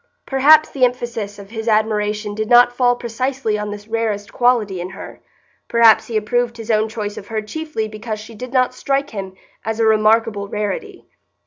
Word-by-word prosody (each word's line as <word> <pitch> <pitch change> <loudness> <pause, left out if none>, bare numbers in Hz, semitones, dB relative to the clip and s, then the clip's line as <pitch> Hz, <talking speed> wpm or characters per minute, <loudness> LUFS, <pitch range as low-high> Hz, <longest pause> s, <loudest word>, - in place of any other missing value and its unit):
Perhaps 300 +4 +5
the 270 - -2
emphasis 235 -5 -1
of 200 0 -12
his 225 0 -6
admiration 210 -1 0
did 215 +1 -3
not 245 0 +6
fall 245 -1 +3
precisely 245 0 -2
on 210 0 -4
this 205 0 -8
rarest 220 -3 -2
quality 225 -7 +1
in 180 - -5
her; 195 +2 -10 0.5
perhaps 230 -2 +5
he 225 - -1
approved 235 +2 -1
his 225 0 -4
own 215 0 +2
choice 210 -2 -5
of 200 - -9
her 220 -1 -2
chiefly 225 0 -4
because 215 0 -6
she 225 +2 -11
did 250 +3 -8
not 255 -1 +2
strike 275 +2 -1
him 190 -3 -6 0.3
as 225 0 -3
a 225 - +3
remarkable 215 -1 +2
rarity. 210 - -4
220 Hz, 185 wpm, -19 LUFS, 210-245 Hz, 0.5 s, not